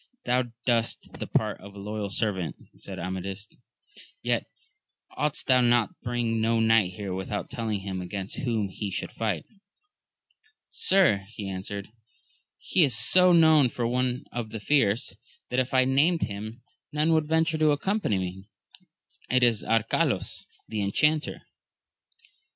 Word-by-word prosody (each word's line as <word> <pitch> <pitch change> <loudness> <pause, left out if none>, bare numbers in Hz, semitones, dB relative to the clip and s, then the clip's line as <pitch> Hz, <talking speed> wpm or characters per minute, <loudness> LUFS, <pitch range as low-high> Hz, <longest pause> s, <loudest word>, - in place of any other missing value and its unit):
Thou 125 +1 +2 0.2
dbest 115 -2 0
the - - -4
part - - -1
of 100 +1 -12
a - - -11
loyal 105 0 -4
servant, 95 -4 -1 0.2
said 95 - -8
Amadis; 95 +3 -5 0.8
yet - - 0 0.7
oughtest 150 -1 -1
thou 130 -1 +4
to 120 -3 +3
bring 120 -2 -1
no 115 +1 +2
knight 110 -5 +3
here 95 0 -5
without 95 +2 -4
telling 110 -6 -3
him 95 -1 -4
against 95 +2 -5
whom 115 -6 -1
he 100 +2 -5
should 95 - -4
fight. 110 -2 -2 1.3
Sir, 170 - +3
he 105 -2 -7
answered, 95 +1 -5 0.7
he 180 - +2
is 135 -7 +4
so 180 +11 +6
known 160 -5 +6
for 120 0 -3
one 125 +1 -1
of 120 -2 -4
the 110 - -6
fierce, 115 -3 +1 0.4
that 125 - +1
if 130 +1 -1
I 130 - +4
had 130 - +1
named 160 +6 +3
him 110 +3 -6 0.3
none 150 +2 +2
would 155 -1 +2
venture 160 0 +1
to 155 -1 +4
accompany 150 - 0
me, 95 +2 -5 0.4
— - - -60 0.3
it 125 0 +3
is 115 -3 +3
Arcalaus, 115 0 0 0.2
the 110 -1 -3
Enchanter. 150 +10 +1
115 Hz, 150 wpm, -27 LUFS, 100-130 Hz, 1.3 s, so